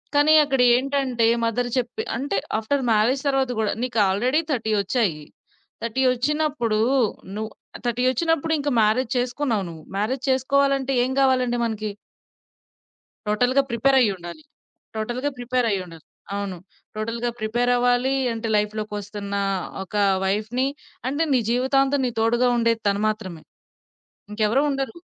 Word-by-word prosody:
కానీ, 290 +2 +5
అక్కడ 270 -3 +1
ఏంటంటే 260 -2 0 0.2
మదర్ 245 +2 -1
చెప్పి 245 -1 -2
అంటే 265 -4 -2 0.2
ఆఫ్టర్ 265 +5 -1
మ్యారేజ్ 230 +5 +2
తరువాత 270 -2 +1
కూడా 215 - 0
నీకు 250 -3 -1
ఆల్రెడీ 245 +10 +1
30 225 -5 -1
ఒచ్చాయి. 200 -7 0 0.6
30 230 +3 -1
ఓచ్చినప్పుడు 275 -3 0 0.6
నువ్వు 215 +1 -4 0.3
30 240 +1 0
ఓచ్చినప్పుడు, 325 +4 0
ఇంక 290 0 -1
మ్యారేజ్ 225 +3 +2
చేసుకున్నావు 245 -3 -1
నువ్వు. 160 -2 -10
మ్యారేజ్ 245 +6 -1
చేసుకోవాలంటే 275 +1 +2
ఏం 260 - -3
కావాలండి 255 -2 +2
మనకి? 215 -2 -3 1.4
టోటల్‌గా 245 +6 +3
ప్రిపేరైయుండాలి. 235 - +1 0.5
టోటల్‌గా 240 +6 -2
ప్రిపేరైయుండాలి. 220 -10 -2 0.3
అవును. 200 -2 -4 0.4
టోటల్‌గా 230 +2 -2
ప్రిపేరవ్వాలి 245 +3 +1 0.2
అంటే, 230 0 -4
లైఫ్‌లోకొస్తున్న 210 -1 -3 0.5
ఒక 190 - -18 0.3
వైఫ్‌ని 215 +6 0 0.4
అంటే 285 +4 0
నీ 255 - +4
జీవితాంతం 270 +2 +2
తోడుగా 240 +2 +3
ఉండేది 230 -1 +1
తను 200 +1 0
మాత్రమే. 190 -7 -5 0.9
ఇంకెవరు 215 +6 +2
ఉండరు. 270 +3 -3
245 Hz, 115 wpm, -23 LUFS, 215-265 Hz, 1.4 s, కానీ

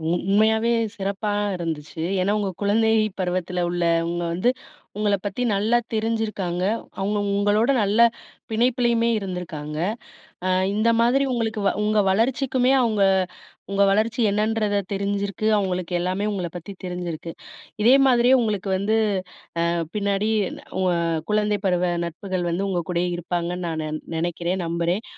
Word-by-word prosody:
உண்மையாவே 220 +5 +2 0.2
சிறப்பா 200 +1 -2 0.2
இருந்துச்சு. 160 -2 -5 0.2
ஏனா 195 +2 +1
உங்க 200 -2 -1
குழந்தை 220 +2 +3 0.3
பருவத்துல 180 -1 -1
உள்ளவுங்க 170 0 0
வந்து, 185 +8 +2 0.5
உங்கள 210 -1 +2
பத்தி 205 +4 -3
நல்லா 215 +4 +2 0.2
தெரிஞ்சிருக்காங்க. 215 -5 -1 0.4
அவுங்க 205 +2 0 0.2
உங்களோட 205 +4 +2
நல்ல 205 +2 +1 0.5
பிணைப்பிலயுமே 235 0 +2
இருந்துருக்காங்க. 175 -6 -5 0.7
அ - - +1 0.3
இந்த 215 +2 +2
மாதிரி 250 +4 +3
உங்களுக்கு 225 -2 -1 0.2
உங்க 215 0 +2
வளர்ச்சிக்குமே 250 +4 +2
அவுங்க 215 -5 +2 0.7
உங்க 200 0 +3
வளர்ச்சி 220 +4 +1
என்னன்றத 210 0 +1 0.2
தெரிஞ்சிருக்கு, 200 +1 -2
அவங்களுக்கு 185 -3 -2
எல்லாமே 185 +3 -1
உங்கள 185 -4 -2
பத்தி 175 +3 -7
தெரிஞ்சிருக்கு. 175 -2 -5 0.5
இதே 235 +4 +6
மாதிரியே 245 0 +5
உங்களுக்கு 210 -3 -1
வந்து 210 +3 +1 0.7
அ - - +1 0.3
பின்னாடி 200 0 0 0.2
இந்த - - -10 0.2
உ-அ 180 -2 +2 0.3
குழந்தை 210 -1 +1
பருவ 180 -1 +1
நட்புகள் 175 +1 -3
வந்து 185 +4 -1
உங்க 180 -2 0
கூடயே 175 0 0
இருப்பாங்கன்னு 175 +1 -3
நான் 160 -1 -2
நெ - - -4 0.3
நெனைக்கிறேன், 175 +2 -1
நம்புறேன். 170 +5 -1
200 Hz, 125 wpm, -23 LUFS, 180-220 Hz, 0.7 s, இதே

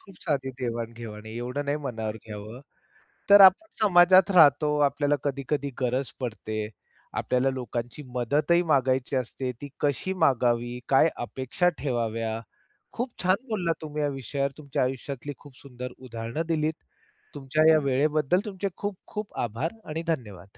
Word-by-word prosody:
खूप 195 -2 -16
साधी 135 -4 -1
देवाण-घेवाण 115 -2 -5
आहे. 110 - -8
एवढं 125 +4 -3
नाही 145 +1 0
मनावर 110 -7 -4
घ्यावं, 110 +3 -8 0.7
तर 200 0 +10
आपण 190 - +3 0.2
समाजात 185 -1 +6
राहतो, 150 -4 +5
आपल्याला 145 +1 0
कधी-कधी 140 0 -2
गरज 130 +1 0
पडते, 110 -3 -4 0.6
आपल्याला 130 +1 +1
लोकांची 120 +1 -5
मदतही 150 +8 +2
मागायची 135 -4 +1
असते. 130 +1 -2
ती 145 - -6
कशी 145 +6 0
मागावी, 120 -2 +1
काय 135 +4 +5
अपेक्षा 130 +8 -1
ठेवाव्या, 115 -4 -2 0.5
खूप 245 +1 -3
छान 185 +6 +2
बोललात 180 -7 0
तुम्ही 150 -1 -4
या 145 - +2
विषयावर. 140 +1 -2
तुमच्या 140 -3 -2
आयुष्यातली 135 +2 -3
खूप 145 -3 -16
सुंदर 125 -2 -8
उदाहरणं 115 +3 -4
दिलीत. 155 -1 +1 0.6
तुमच्या 145 +3 +2
या 160 - +7
वेळेबद्दल 150 +4 +2
तुमचे 200 -1 -3
खूप 205 -1 -3
खूप 210 -1 -6
आभार 120 +8 -2 0.2
आणि 160 +2 -3
धन्यवाद. 105 - -4
135 Hz, 140 wpm, -27 LUFS, 120-155 Hz, 0.7 s, तर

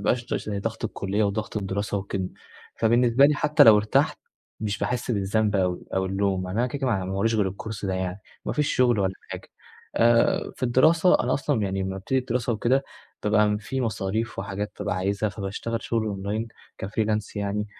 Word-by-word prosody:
يبقاش 120 -1 +1
كتير - - -3
عشان 105 -2 -4
ضغط 115 +2 -4
الكلية 100 0 -1
وضغط 105 +2 -2
الدراسة 100 +1 -2
وكده، 95 -1 -3 0.5
فبالنسبة 120 +3 +4
لي 150 - +2
حتى 150 +1 +4
لو 110 -2 +9
ارتحت 105 +1 +2 0.4
مش 105 -1 -2
باحسّ 125 0 -2
بالذنب 105 0 +1
أوي 90 -2 0
أو 95 0 +1
اللوم، 95 -1 0
يعني 95 +5 -3
أنا 125 - +3
كده، 140 +3 -4
كده، 135 - -1
ما - - +3
ع 95 -2 -1
ما 95 - -4
وراييش 115 +4 +1
غير 100 -3 +2
الكورس 100 +2 -6
ده 95 - -1
يعني. 95 +1 -3 0.2
ما - - -2
فيش 150 -1 0
شغل 120 -4 +4
ولا 95 -1 +1 0.2
حاجة - - -7 0.5
آآ 115 0 +3
في - - -17
الدراسة 160 +8 +4
أنا 125 - +1
أصلًا 140 -5 0
يعني 95 -1 -1
لمّا 95 - -2
بابتدي 95 +8 -1
الدراسة 125 -1 -1
وكده، 130 +5 +1 0.4
بابقى 105 0 +3
في 130 +5 -3
مصاريف 110 0 -2
وحاجات 100 +2 -4
بابقى 105 0 -2
عايزها، 100 +3 0
فباشتغل 100 +4 -4
شغل 115 -2 -1
أونلاين 105 +3 -3 0.4
كfreelance 105 0 -1
يعني 105 +1 -1
105 Hz, 190 wpm, -25 LUFS, 100-115 Hz, 0.5 s, لو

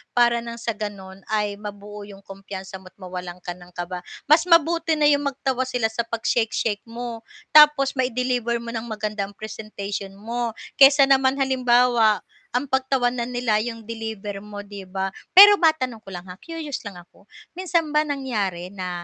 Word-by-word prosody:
para 240 -1 +4
nang 235 0 -7
sa 235 0 -3
gano'n 200 -3 -7
ay 210 -1 -1
mabuo 205 0 -9
'yung 200 -1 -13
kumpiyansa 195 -1 -9
mo't 185 0 -16
mawalan 180 -2 -8
ka 175 - -4
ng 175 0 -13
kaba. 175 +1 -5 0.2
Mas 310 +4 +4
mabuti 335 -1 +3
na 305 - 0
'yung 290 -1 +4
magtawa 265 -2 -2
sila 245 -3 -1
sa 230 +1 -3
'pag 230 -1 -4
shake-shake 225 -2 0
mo, 230 -1 -7 0.2
tapos 300 -3 +7
mai-deliver 250 -1 0
mo 235 - -6
ng 230 0 -5
maganda 215 -2 -3
ang 200 - -15
presentation 205 -2 -6
mo. 230 +2 -4 0.2
Kaysa 275 +1 +8
naman 270 -1 +4
halimbawa 245 -4 +3 0.3
ang 255 +2 -1
pagtawanan 250 -2 0
nila 230 -3 +1
'yung 230 0 -5
deliver 220 -3 -6
mo 205 0 -9
'di 200 -2 -10
ba? 190 +1 -3 0.2
Pero 410 +2 +10
matanong 260 -8 +1
ko 215 - -36
lang, 175 -2 -7
ha, 180 - -12
curious 320 -4 -6
lang 200 - -9
ako, 175 +3 -17 0.2
minsan 340 -3 -1
ba 300 0 +2
nangyari 210 -11 -3
na 180 -3 -5
230 Hz, 170 wpm, -23 LUFS, 200-260 Hz, 0.3 s, Pero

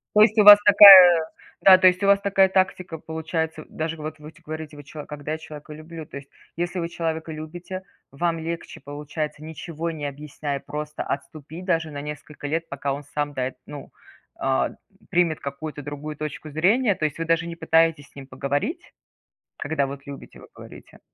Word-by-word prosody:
То 210 - +7
есть 215 0 +4
у 210 - +6
вас 205 0 +11
такая 185 -5 +9 0.4
да, 190 -1 +9
то 185 - +3
есть 180 +2 0
у - - +2
вас 200 0 +5
такая 195 -1 +3
тактика 185 -2 -1
получается, 160 0 -4
даже 160 +1 -5
вот 155 +1 -7
вы, 150 +1 -11
ть 170 - -23
говорите: 155 -1 -8
"Вы - - -10
чё, 150 +1 -10
когда 150 0 -6
я 160 - -3
человека 150 -1 -11
люблю". 160 +1 -10
То - - -12
есть, 140 0 -10 0.3
если 175 +2 -3
вы 170 -1 -2
человека 160 -1 -4
любите, 175 +4 -8 0.3
вам 165 +3 -1
легче 165 +1 -6
получается, 150 +2 -6
ничего 160 +1 -6
не 155 -3 -5
объясняя, 145 0 -5
просто 150 +2 -6
отступить 155 +5 -7
даже 165 -4 0
на 145 -1 -7
несколько 150 0 -8
лет, 165 +3 -2
пока 140 0 -3
он 145 - -7
сам, 145 -1 -2
да, 130 -1 -1
эт 130 - -14
ну, 145 -2 -10 0.5
а, 135 0 0 0.4
примет 175 -4 +1
какую-то 145 +2 -7
другую 145 +2 -7
точку 150 +1 -6
зрения. 200 - +2
То 155 - -4
есть 150 0 -2
вы 165 - -3
даже 165 0 +1
не 170 0 -7
пытаетесь 160 -3 +1
с - - -31
ним 140 -1 -10
поговорить, 140 - -4 0.6
когда 145 -2 -2
вот 140 0 -8
любите, 140 -1 -11
вы - - -14
говорите? - - -14
155 Hz, 195 wpm, -23 LUFS, 145-170 Hz, 0.6 s, вас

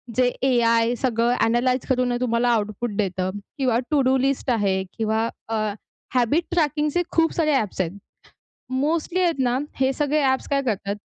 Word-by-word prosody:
जे 250 -1 +3 0.2
एआय 230 -2 +3
सगळं 240 0 +1
ॲनलाइज 245 +2 +1
करून 255 -1 +1
ना 245 - 0
तुम्हाला 240 0 +1
आउटपुट 215 0 -1
देतं 185 -3 -1 0.3
किंवा 255 -4 +1
टू 290 - +3
डू 260 0 +3
लिस्ट 270 0 0
आहे 195 -4 +1
किंवा 220 0 0 0.2
अ, - - -2 0.6
हॅबिट 255 +7 +2
ट्रॅकिंगचे 300 -1 +1
खूप 325 0 +2
सारे 310 -2 +2
ॲप्स 215 -7 0
आहेत. 170 -2 -2 0.8
मोस्टली 320 +6 0
आहेत 335 -6 +1
ना, 250 -1 +1 0.2
हे 265 0 +3
सगळे 295 +2 0
ॲप्स 265 -1 +1
काय 280 -1 +1
करतात 200 -3 -2
250 Hz, 160 wpm, -23 LUFS, 230-275 Hz, 0.8 s, जे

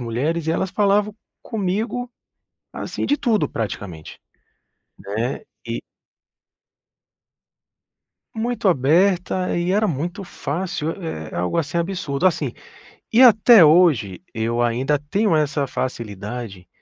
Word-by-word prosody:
mulheres, 145 +8 -2
e 160 - +2
elas 190 +2 -1
falavam 205 0 +2 0.3
comigo, 225 +4 -2 0.6
assim, - - -4
de 290 - +2
tudo 230 -7 +1
praticamente, 100 -7 -6 0.8
né. 110 +6 -3 0.3
E - - -4 2.5
Muito 230 -2 -1
aberta 180 +5 +2
e 175 +1 0
era 210 +2 +2
muito 175 +6 -3
fácil, 165 -2 -3
eh, 160 - -6
algo 90 - -1
assim 165 +1 -1
absurdo, 170 -3 -1
assim, 180 - 0 0.6
e 235 - +6
até 230 -4 +8
hoje, 150 - +4
eu 115 +2 -1
ainda 125 +5 +1
tenho 165 +6 0
essa 145 -2 0
facilidade 105 -5 -5
165 Hz, 105 wpm, -21 LUFS, 120-195 Hz, 2.5 s, até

